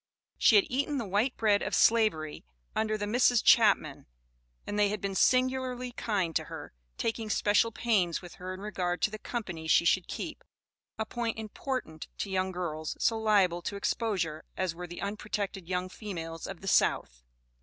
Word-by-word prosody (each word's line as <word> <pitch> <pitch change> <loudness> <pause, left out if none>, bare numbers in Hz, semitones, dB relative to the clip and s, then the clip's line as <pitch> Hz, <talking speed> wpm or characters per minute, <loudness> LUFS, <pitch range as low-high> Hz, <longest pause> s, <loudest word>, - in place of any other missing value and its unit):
She - - +6
had 400 -3 +6
eaten 280 +3 -1
the 235 - -2
white 210 +7 0
bread 210 -2 +3
of - - -1
Slavery, 210 -10 +2 0.3
under 215 0 0
the 205 - -2
Misses 245 +2 +4
Chapman, 200 -12 +4 0.6
and 205 - -3
they 205 -1 +4
had 210 +1 -2
been 200 0 -3
singularly 255 +2 +1
kind 195 -9 -1
to - - -5
her, - - -9 0.2
taking 225 -1 -2
special 210 +2 +3
pains 210 -7 +1
with 175 -2 -11
her 185 +1 -4
in 185 +1 -7
regard 180 -4 -2
to 215 - +3
the 215 - -6
company 185 -11 -5
she 170 - +4
should 185 +1 +3
keep, 320 -2 -6 0.5
a 220 - -1
point 230 0 -3
important 220 - -5
to 200 - -4
young 190 0 0
girls, 160 -4 -4
so 225 -1 +2
liable 195 -5 +3
to 200 - -4
exposure 190 -7 -1
as 185 -2 -1
were 180 +1 -7
the 175 +2 -7
unprotected 200 -3 -4
young 180 0 -1
females 165 -5 -6
of 190 -3 -8
the 195 - -8
South. - - +2
205 Hz, 175 wpm, -30 LUFS, 180-225 Hz, 0.6 s, She